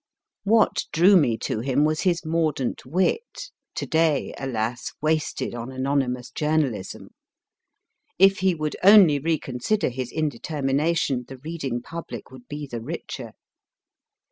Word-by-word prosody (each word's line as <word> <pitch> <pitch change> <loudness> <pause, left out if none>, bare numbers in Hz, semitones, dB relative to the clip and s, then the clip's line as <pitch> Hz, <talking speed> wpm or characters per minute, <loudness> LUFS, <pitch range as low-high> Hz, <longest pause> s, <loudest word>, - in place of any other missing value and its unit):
What 215 0 +3
drew 180 +5 +5
me 130 -10 +4
to - - -2
him 135 +4 +1
was 155 0 0
his 175 -3 0
mordant 155 -5 -1
wit 450 - -1 0.2
(to - - -3
day, 160 -3 +1
alas! 120 -2 -3
wasted 155 -4 -1
on 120 +2 -6
anonymous 130 -2 -1
journalism! 150 -10 -1 1.1
If 195 +2 +5
he 190 -2 +2
would 155 -1 -3
only 190 -7 +7
reconsider 155 - -1
his 125 0 -5
indetermination, 145 -1 -1
the 135 - -9
reading 135 -4 -4
public 165 -4 -8
would 130 -2 -14
be 145 0 -6
the 120 -4 -6
richer - - -6
150 Hz, 125 wpm, -24 LUFS, 130-165 Hz, 1.1 s, only